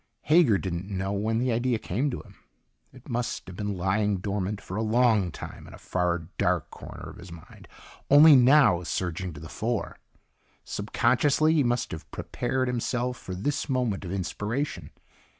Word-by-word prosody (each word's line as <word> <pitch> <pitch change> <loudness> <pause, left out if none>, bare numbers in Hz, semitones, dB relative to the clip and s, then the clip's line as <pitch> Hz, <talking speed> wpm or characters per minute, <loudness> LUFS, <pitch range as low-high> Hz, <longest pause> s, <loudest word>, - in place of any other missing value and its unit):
Hager 150 - +5
didn't 95 0 -4
know 95 0 -2
when 110 +3 0
the 125 +2 +1
idea 120 +1 +1
came 115 +6 -1
to 125 - -5
him. 100 -3 -18 0.5
It 130 -1 -16
must 120 -2 -2
have 90 - -10
been 105 0 -3
lying 100 +3 +1
dormant 100 +1 -3
for 95 - -8
a 110 - -1
long 110 -4 +3
time - - -9
in - - -11
a - - -13
far, 90 -2 -1
dark 90 -3 +1
corner - - -9
of - - -14
his 90 0 -11
mind, 85 -1 -13 0.4
only 145 +2 +9
now 130 - +6
surging 90 +1 -3
to 70 - -10
the 80 - -9
fore. 110 +6 -3 0.6
Subconsciously 135 +9 +2
he 155 -3 +3
must 120 0 0
have 80 - -8
prepared 130 -1 -2
himself 125 0 -1
for 95 -6 -7
this 140 +11 -2
moment 125 -7 0
of 90 - -6
inspiration. 100 - -3
105 Hz, 170 wpm, -27 LUFS, 95-125 Hz, 0.6 s, only